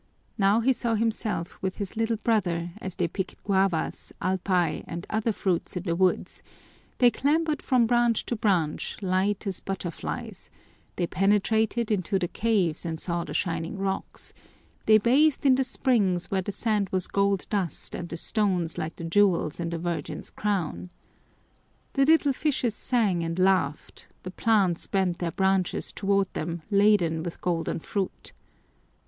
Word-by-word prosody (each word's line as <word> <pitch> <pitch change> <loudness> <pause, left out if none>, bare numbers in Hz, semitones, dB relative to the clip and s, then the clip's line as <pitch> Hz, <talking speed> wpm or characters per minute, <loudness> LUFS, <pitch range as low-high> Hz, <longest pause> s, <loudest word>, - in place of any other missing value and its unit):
Now 205 +2 +3
he 260 +3 +3
saw 235 -2 -1
himself 215 -5 -2
with 190 -1 -2
his 200 -1 -5
little 225 0 0
brother 175 -7 0
as 185 -2 -5
they 175 - 0
picked 190 +3 -5
guavas, 190 -4 0
alpay, 180 -4 0
and 170 +2 -6
other 220 +1 +1
fruits 185 -3 -2
in 180 - -4
the 170 -3 -1
woods; 185 +1 0 0.6
they 245 -1 +5
clambered 300 +3 +1
from 250 -3 +3
branch 240 -1 +2
to 240 - -2
branch, 185 -8 0
light 190 +3 0
as 195 -2 -2
butterflies; 190 -4 -5 0.5
they 175 - 0
penetrated 215 +4 +1
into 195 -1 +1
the 180 -2 -1
caves 190 -6 0
and 165 -2 -4
saw 170 -1 -1
the - - -7
shining 165 0 -2
rocks; 195 0 -4 0.5
they 215 - +8
bathed 270 +8 +3
in 270 - +7
the 265 +1 +2
springs 215 -9 +1
where 190 -1 +1
the 195 - -4
sand 210 -2 0
was 185 -1 0
gold 200 -1 +1
dust 190 -7 -2
and 175 - -5
the 165 - -4
stones 180 -4 0
like 160 0 -4
the - - -8
jewels 170 -3 +2
in 170 -1 -2
the 170 - -3
Virgin's 170 0 -4
crown. 185 -4 -2 1.0
The 275 -1 +3
little 305 -2 +4
fishes 260 -5 0
sang 210 -8 0
and 165 +1 -3
laughed, 185 -6 0 0.2
the 185 - -6
plants 195 -5 +2
bent 185 -3 0
their 175 - -1
branches 190 +1 +1
toward 195 -1 0
them 165 0 -4
laden 200 -6 +3
with 170 0 -6
golden 170 -2 -1
fruit. 195 +3 -4
195 Hz, 155 wpm, -26 LUFS, 175-220 Hz, 1.0 s, they